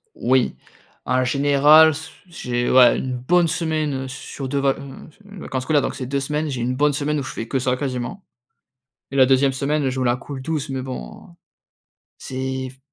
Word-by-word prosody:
Oui, 130 0 +1 0.5
en 130 0 +1
général, 145 +4 +5
s 160 +2 -7 0.2
j'ai, 125 -8 -3
ouais, 125 -1 +6
1 130 -1 -3
bonne 170 +7 +2
semaine 155 -5 -1
sur 130 +1 -7
2 140 - 0
vac 135 -1 +1
mmh 140 +2 -11
mh, 205 -1 -12
vacances 130 -3 -4
scolaires, 145 +1 +2
donc - - -3
c'est 130 -2 -5
2 140 +2 -1
semaines, 150 +2 -2
j'ai 130 - -4
1 125 +1 -1
bonne 150 +2 +3
semaine 150 +1 -1
où 140 - -3
je - - -6
fais 115 - -5
que 135 - -1
ça 125 0 0
quasiment, 130 +7 -4 0.9
et - - -3
la 130 - +7
2e 135 +1 +3
semaine 140 +1 -1
je 130 0 -3
me 130 - 0
la 120 0 +2
coule 135 0 -8
douce 155 -2 -3
mais 130 -1 -3
bon, 125 - -8
heu, - - -17 0.9
c'est 130 0 -4
f 130 - -20
135 Hz, 205 wpm, -21 LUFS, 130-150 Hz, 0.9 s, la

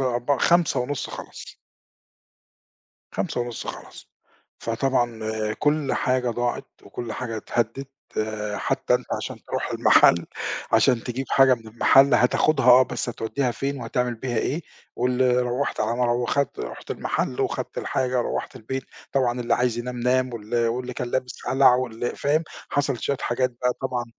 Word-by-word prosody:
أربعة 125 +1 0
17:30 145 -6 +1
خَلص. - - -9 1.6
17:30 120 -1 -3
خَلص، - - -9 0.5
فطبعًا 120 -1 0 0.4
كُلّ 150 -2 +1
حاجة 125 -1 +1
ضاعت 120 +1 -2 0.2
وكُلّ 115 -3 -6
حاجة 115 -1 -4
اتهدت، 120 +4 -2 0.7
حتى - - 0
أنت - - -1 0.2
عشان - - -5
تروح - - -3
المحل، 85 0 +5 0.5
عشان 115 +1 +4
تجيب 130 +2 -3
حاجة 135 -1 +6
من 115 -2 -13
المحل 135 +5 +5
هتاخدها 135 +2 +3
آه، 125 +1 +9
بس 125 - -3
هتوديها 120 +3 -1
فين 135 +3 -3
وهتعمل 120 +1 -1
بيها 120 0 -3
إيه، 155 +9 -1 0.3
وال 125 0 +2
روّحت 125 +3 -2
على 115 +2 0
ما 125 - +2
رو 120 0 +1
وخدْت 140 +2 0
رُحت - - -7
المحل 65 - -2
وخدْت - - -2
الحاجة، 125 -1 0
روّحت - - -3
البيت، 130 +4 -4 0.3
طبعًا 125 -2 +1
اللي 120 - +2
عايز 120 -1 0
ينام 125 0 -4
نام، 130 +1 +1
وال 115 +2 -1
واللي 125 +2 -3
كان 120 - -3
لابس 130 -1 -3
قلع 135 -1 +6
واللي 120 -1 -2
فاهم، 150 +3 +1 0.3
حصل 140 -2 0
شوية 140 - 0
حاجات 125 +1 0
بقى 125 +1 -1
طبعًا 125 -2 -1
125 Hz, 145 wpm, -24 LUFS, 120-130 Hz, 1.6 s, آه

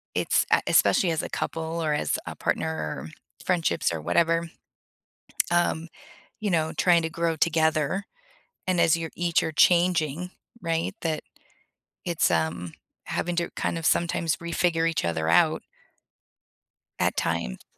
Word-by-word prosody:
It's - - +2
uh, - - +5
especially 180 - +4
as 160 - -1
a - - -4
couple, 165 +1 -3
or 155 -1 0
as 150 - 0
a - - -6
partner, - - -1
or 75 -2 -5 0.4
friendships, 170 - +1
or 80 - -3
whatever, 165 - +1 1.0
um, 170 -1 +1 0.5
you 210 -2 -1
know, 160 -2 +1
trying 175 -2 +4
to 160 - -2
grow 165 -1 -1
together, 160 +3 +1 0.6
and 185 -2 +1
as 165 - +4
you're 165 -1 -4
each 175 0 +1
are 160 - -2
changing, 175 0 +3 0.3
right, 165 -1 -1
that 160 -2 -1 0.8
it's, 170 -2 +1
um, 80 +1 -1 0.3
having 175 0 -2
to 170 - 0
kind - - -1
of 165 - -5
sometimes 170 -1 +1
refigure 170 -1 0
each 160 - -1
other 80 -1 -1
out 85 - +4 1.4
at - - +1
times. 80 -7 -2
165 Hz, 140 wpm, -26 LUFS, 150-170 Hz, 1.4 s, uh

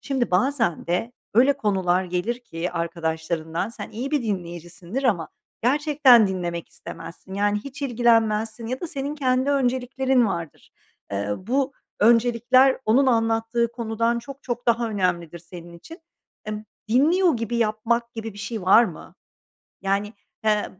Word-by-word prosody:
Şimdi 265 -6 -1
bazen 225 - +1
de 180 +8 -1 0.2
öyle 260 +5 +6
konular 190 -7 +1
gelir 180 +7 -2
ki 175 -6 -5
arkadaşlarından, 165 +1 -2
sen 220 -3 -8
iyi 250 +6 -5
bir 295 -4 +1
dinleyicisindir 175 - -5
ama 175 -10 +1 0.3
gerçekten 275 -3 +5
dinlemek 175 -3 -4
istemezsin. 170 +2 -10
Yani, 205 +1 +1
hiç 275 +1 -8
ilgilenmezsin 225 -3 +1
ya 255 +2 -4
da 345 - -3
senin 285 0 -4
kendi 260 -1 +1
önceliklerin 260 -1 +1
vardır. 170 -6 -5 0.4
Eee, 100 +1 -2
bu 265 +7 -1 0.3
öncelikler 240 +3 +4
onun 260 +5 +4
anlattığı 225 0 +1
konudan 230 0 -1
çok 275 +4 -10
çok 240 -1 -4
daha 235 0 +2
önemlidir 175 -4 -1
senin 170 0 -12
için. 330 - -12 0.5
Emm, 215 0 -5 0.2
dinliyor 315 - +3
gibi 230 +1 -3
yapmak 235 +2 0
gibi 225 -1 -5
bir 200 - -13
şey 215 -1 -5
var 210 +6 +6
mı? - - -9 0.7
Yani, 200 +2 -1 0.3
he, 210 -1 +2
225 Hz, 140 wpm, -24 LUFS, 185-255 Hz, 0.7 s, öyle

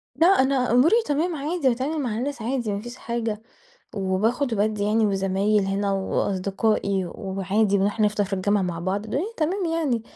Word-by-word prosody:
لأ، 325 +6 +4
أنا 265 -9 +3
أموري 255 - +5
تمام 320 +4 0
عادي، 300 0 0
باتعامل 270 +6 -1
مع 230 -5 -2
الناس 275 +1 -3
عادي 235 -2 -2
ما 200 - -3
فيش 240 +2 -8
حاجة، 230 -2 -3 0.5
وباخد 215 +7 0
وبادّي 210 -1 0
يعني، 220 +1 +2
وزمايل 195 +1 +1
هنا 195 +1 0
وأصدقائي 195 +1 0
وعادي، 195 +2 0
بنروح 205 +3 0
نفطر 210 -1 +2
في 195 - -10
الجامعة 195 +1 +1
مع 175 -2 -3
بعض 190 +4 -2
الدنيا 295 - -3
تمام 360 +5 0
يعني، 320 -9 0
215 Hz, 165 wpm, -24 LUFS, 195-265 Hz, 0.5 s, أموري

